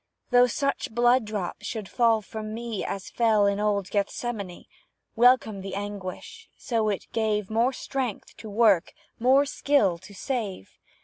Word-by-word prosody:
Though 245 0 +6
such 275 +3 -1
blood 240 0 +4
drops 210 -4 -4
should 220 -4 -4
fall 230 -2 +2
from 215 +1 -6
me 230 -3 -4
As 195 -1 -5
fell 220 -3 +3
in 200 0 +1
old 205 -2 0
Gethsemane, 200 -2 -3 0.5
Welcome 235 -4 +4
the 195 0 -6
anguish, 205 - -7
so 225 -5 0
it 200 - -3
gave 215 -2 0
More 230 +4 +2
strength 260 -4 -4
to 220 - -9
work 205 -4 +3 0.3
more 265 +4 +5
skill 265 -10 +1
to 195 +3 -14
save. 210 - -4
220 Hz, 145 wpm, -26 LUFS, 200-240 Hz, 0.5 s, Though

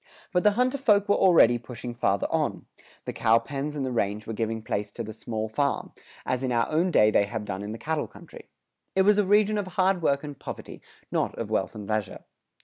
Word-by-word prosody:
But 180 - +3
the 210 +1 +4
hunter 255 +2 +1
folk 205 -5 +3
were 205 - +4
already 165 -11 +5
pushing 120 0 -7
farther 100 -4 0
on; - - -1 0.4
the - - -4
cow 110 +1 +4
pens 140 +5 -4
and 140 -2 -2
the 130 - -3
range 105 -2 -1
were 115 - -5
giving 110 0 -2
place 105 -1 -3
to 115 - -5
the 110 0 -7
small 110 0 -4
farm, 140 +6 -1 0.3
as 130 0 -1
in 130 - -1
our 115 -1 +2
own 165 +4 +2
day 105 -10 +5
they 100 - +3
have 105 0 -5
done 100 -1 -4
in 105 +1 -5
the 110 - -5
cattle 155 +4 -2
country. - - -14 0.5
It 190 - +4
was 210 +1 +4
a 205 - +3
region 210 +1 +3
of 200 - -3
hard 185 -1 +3
work 140 -3 +1
and 145 -2 -8
poverty, - - -8 0.3
not - - 0
of - - -5
wealth - - -1
and 105 -2 -7
leisure. 110 -1 -3
125 Hz, 230 wpm, -26 LUFS, 110-185 Hz, 0.5 s, already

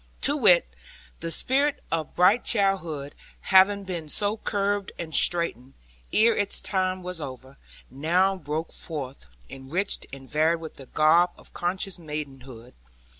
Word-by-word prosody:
To 285 - +2
wit, 205 -11 +5 0.5
the 165 - -4
spirit 280 - +1
of 160 -2 -3
bright 195 +7 +4
childhood, 170 -9 0 0.3
having 195 +1 +4
been 175 -5 -6
so 205 +6 0
curbed 205 -2 -2
and 160 -2 -6
straitened, 140 -6 +2 0.4
ere 225 +1 +4
its 205 -1 -1
time 185 -1 -1
was 180 -2 -6
over, 130 -1 -9 0.3
now 175 +8 +1
broke 160 -2 -5
forth, 140 - -7 0.2
enriched 155 +10 -3
and 135 -1 -10
varied 160 +3 +2
with 160 -1 -9
the 135 - -12
garb 160 +5 +4
of - - -11
conscious 185 +1 -2
maidenhood. 135 -6 -8
170 Hz, 135 wpm, -25 LUFS, 145-195 Hz, 0.5 s, wit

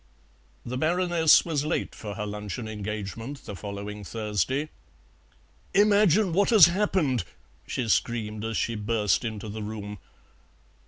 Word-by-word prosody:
The 125 +2 -4
Baroness 170 0 +4
was 155 -4 -1
late 155 - -2
for 105 -2 -7
her 105 -1 -3
luncheon 105 +2 -5
engagement 110 +5 -6
the 105 - -6
following 100 +1 -6
Thursday. 110 - -2 1.1
"Imagine 205 -2 +4
what 200 +3 +3
has 215 -8 +9
happened!" 170 - +1 0.4
she 125 - -2
screamed 110 -1 0
as 115 0 -2
she 115 - 0
burst 105 0 0
into 110 -2 -5
the 110 +1 -6
room. 105 -1 -6
115 Hz, 125 wpm, -26 LUFS, 105-155 Hz, 1.1 s, has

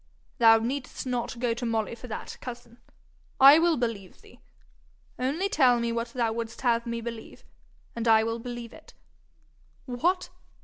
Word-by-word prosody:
'Thou 225 -1 +7
need'st 250 +5 -4
not 245 -2 -3
go 240 -1 0
to 235 - -7
Molly 225 -1 -1
for 235 +2 -10
that, 220 - -7
cousin. 240 -1 -9 0.6
I 275 +4 +9
will 335 -1 +2
believe 225 -6 -4
thee. - - -19 0.8
Only 290 +10 0
tell 255 -10 +3
me 235 0 -1
what 230 0 -2
thou 235 -2 -1
wouldst 230 0 -6
have 235 -2 +1
me 235 0 -3
believe, 230 -1 -8 0.5
and 235 0 -3
I 220 -1 +5
will 230 +1 -2
believe 240 -1 -7
it. - - -16 0.9
What! 340 +9 -1
235 Hz, 160 wpm, -27 LUFS, 230-250 Hz, 0.9 s, I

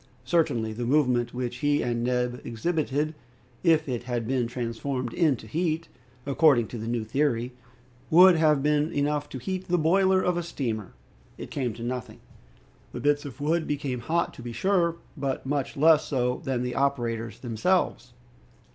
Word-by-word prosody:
Certainly, 125 -10 +1
the 120 +2 -4
movement 125 -4 +2
which 125 -1 -4
he 145 +2 +1
and 120 -1 -1
Neb 125 0 -1
exhibited, 150 +4 -1 0.5
if 160 -3 +3
it 120 -2 -3
had 120 -3 -2
been 125 -2 0
transformed 120 +1 -3
into 150 -10 +1
heat, 160 +6 -2 0.4
according 140 -4 +4
to 120 - -6
the 110 - -5
new 120 -1 -1
theory, 125 0 0 0.6
would 180 +2 +8
have 155 -3 +3
been 150 +1 +2
enough 145 0 -1
to - - -6
heat 185 +8 -4
the 180 - +2
boiler 190 +4 +3
of 180 -1 +1
a - - 0
steamer! 120 - -4 0.4
It - - -8
came 125 -6 -2
to 115 - -8
nothing. 125 0 -5 0.7
The - - -5
bits 145 0 +1
of 140 0 -8
wood 160 +3 0
became 140 -4 -2
hot, 165 +8 -1
to - - -11
be 120 0 -6
sure, 175 - +1 0.2
but 135 -2 -3
much 140 0 -2
less 155 +1 +5
so 125 -3 -1
than 130 -2 -1
the 125 0 -3
operators 120 -5 -1
themselves. 125 - 0
135 Hz, 165 wpm, -26 LUFS, 120-155 Hz, 0.7 s, would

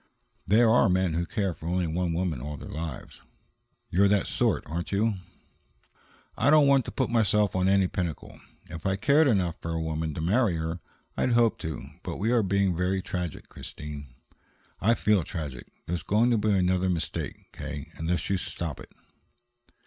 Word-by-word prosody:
"There 115 +4 +5
are 115 -1 +5
men 90 -2 +2
who 85 +1 -1
care 100 -5 -1
for 80 - -9
only 90 +1 0
one 85 +2 -1
woman 85 -6 -1
all 75 +2 -5
their - - -9
lives." 75 -4 -6 0.7
"You're 100 +3 +4
that 100 -1 +2
sort, - - +1
aren't 85 +3 -4
you?" 105 +1 +1 1.2
"I 125 - +2
don't 155 -1 +7
want 140 -2 +4
to - - -5
put - - -1
myself 105 -4 +2
on 95 0 +2
any 95 -1 +4
pinnacle. 85 -6 -5 0.3
If 80 +2 -5
I 95 - +1
cared 140 +9 +4
enough 90 -8 +1
for 85 - -5
a 80 0 -1
woman 80 -1 -2
to - - -4
marry 100 +3 +2
her, 80 +1 -3 0.4
I'd 125 - +1
hope 115 -1 +3
to 80 -2 -5 0.2
But - - -5
we 110 +4 0
are 120 -2 +4
being 100 -2 +1
very 90 +2 0
tragic, 90 -4 -4
Christine." 75 -1 -8 0.7
"I 115 +6 +3
feel 105 -6 +2
tragic. 75 -6 -6 0.2
There's 85 -1 -2
going 110 +9 +2
to 115 - +3
be 105 +1 +1
another 95 -1 +2
mistake, 80 -6 -4
K., 70 -1 -7
unless 85 +2 -2
you 100 - +1
stop 80 -5 -5
it." - - -12
90 Hz, 180 wpm, -27 LUFS, 80-105 Hz, 1.2 s, don't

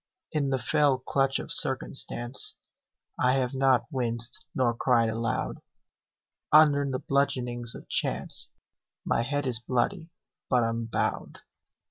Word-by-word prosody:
In 140 -3 0
the 135 - +1
fell 140 +3 +2
clutch 135 +1 0
of - - -6
circumstance 130 -4 +1 0.6
I 125 0 +3
have 130 -1 0
not 135 -2 +3
winced 120 -3 -2
nor 125 -2 +2
cried 115 -1 +2
aloud, 115 +1 -2 0.9
Under 150 -2 +6
the 130 - -1
bludgeonings 125 -4 -1
of - - -11
chance - - 0 0.6
My - - +1
head 145 +4 -2
is 125 -3 +1
bloody, 125 +7 -1 0.4
but 125 -2 +3
unbowed. 115 0 -2
130 Hz, 120 wpm, -27 LUFS, 120-135 Hz, 0.9 s, Under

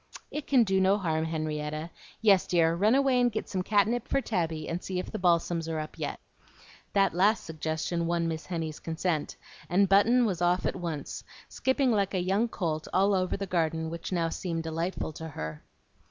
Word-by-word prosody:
"It 300 -1 -5
can 260 -4 +5
do 190 -2 +2
no 190 +2 +4
harm, 160 -5 0
Henrietta. 155 0 -3 0.3
Yes, 195 -4 +5
dear, 165 -2 +3
run 210 +8 +3
away 270 -2 +3
and 245 -1 +3
get 215 - -3
some 185 - -2
catnip 215 +6 +1
for - - +1
Tabby, 165 - -2
and 170 +1 -3
see 185 - -3
if 180 - -4
the 215 - -4
balsams 170 -2 +1
are 160 - -2
up 155 0 -7
yet." - - -3 0.7
That 195 -2 +3
last 200 +6 +3
suggestion 160 +2 -2
won 170 -1 0
Miss 160 -1 -4
Henny's 165 -4 -4
consent; 160 -1 -2 0.3
and 195 +3 +4
Button 230 +6 +5
was 185 -5 -1
off 175 +1 +2
at - - 0
once, 170 -5 -5 0.3
skipping 260 0 +1
like 200 -3 +1
a - - +2
young 195 +6 +1
colt 160 -8 -3
all 195 +2 +3
over 185 -1 0
the 200 - -3
garden, 160 -3 -1
which 170 +2 -6
now 170 -2 +1
seemed 165 -1 -3
delightful 165 0 -3
to 160 +2 -7
her. 80 - -6
175 Hz, 195 wpm, -29 LUFS, 160-200 Hz, 0.7 s, can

